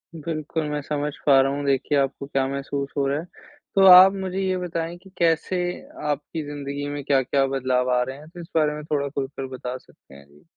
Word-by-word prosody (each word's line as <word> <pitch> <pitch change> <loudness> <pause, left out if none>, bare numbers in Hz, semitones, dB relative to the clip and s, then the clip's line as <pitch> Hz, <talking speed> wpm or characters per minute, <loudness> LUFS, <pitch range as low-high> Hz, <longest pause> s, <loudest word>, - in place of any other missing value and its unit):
बिल्कुल, 160 0 -3
मैं 150 0 -2
समझ 150 +1 -2
पा 135 -2 +6
रहा 135 +1 +1
हूँ 145 0 -3
देखिए 140 +2 +1
आपको 135 0 -2
क्या 135 -1 0
महसूस 140 0 -3
हो 140 - +2
रहा 140 +2 0
है। 165 - -7 0.5
तो 195 -1 +6
आप 185 +1 +10
मुझे 190 -1 -4
ये 190 -1 0
बताएँ 170 -1 -4
कि 190 +2 -17
कैसे 170 +2 +1 0.5
आपकी 150 +2 -4
ज़िंदगी 145 0 -5
में 145 -1 -5
क्या-क्या 135 0 +2
बदलाव 130 -1 0
आ 125 - +2
रहे 130 +2 -6
हैं? 155 +2 -14
तो 175 - -12
इस 165 - -10
बारे 150 -2 +3
में 150 - -7
थोड़ा 145 -2 -1
खुल 135 -1 -3
कर 135 0 -7
बता 125 0 -5
सकते 125 - -21
हैं। 70 - -15
जी। 75 +2 -22
145 Hz, 220 wpm, -24 LUFS, 135-165 Hz, 0.5 s, आप